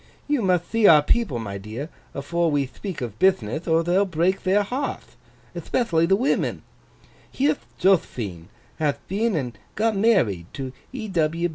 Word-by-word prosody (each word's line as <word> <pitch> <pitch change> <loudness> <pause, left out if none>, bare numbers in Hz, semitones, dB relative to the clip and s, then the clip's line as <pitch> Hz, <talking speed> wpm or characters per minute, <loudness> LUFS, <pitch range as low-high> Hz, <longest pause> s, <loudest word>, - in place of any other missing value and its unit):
You 290 -4 +1
mutht 180 -3 +1
thee 225 -2 +4
our 150 -2 +7
people, 205 - +1
my 100 -4 -5
dear, 110 +10 -6 0.3
afore 170 +5 0
we 145 -2 +1
thpeak 180 +5 -7
of 110 -3 -5
bithnith, 155 - +1
or 165 0 +3
they'll 180 +4 +3
break 180 +1 0
their 195 +2 +2
hearth—ethpethially 230 - -3
the 195 - +6
women. 250 +7 0 0.7
Here'th 285 +2 0
Jothphine 115 - +1 0.3
hath 150 -3 0
been 210 +2 0
and 125 -6 -3 0.2
got 220 +1 +1
married 175 - +2
to 130 -2 -5 0.2
E. 225 -6 -6
170 Hz, 145 wpm, -24 LUFS, 135-205 Hz, 0.7 s, our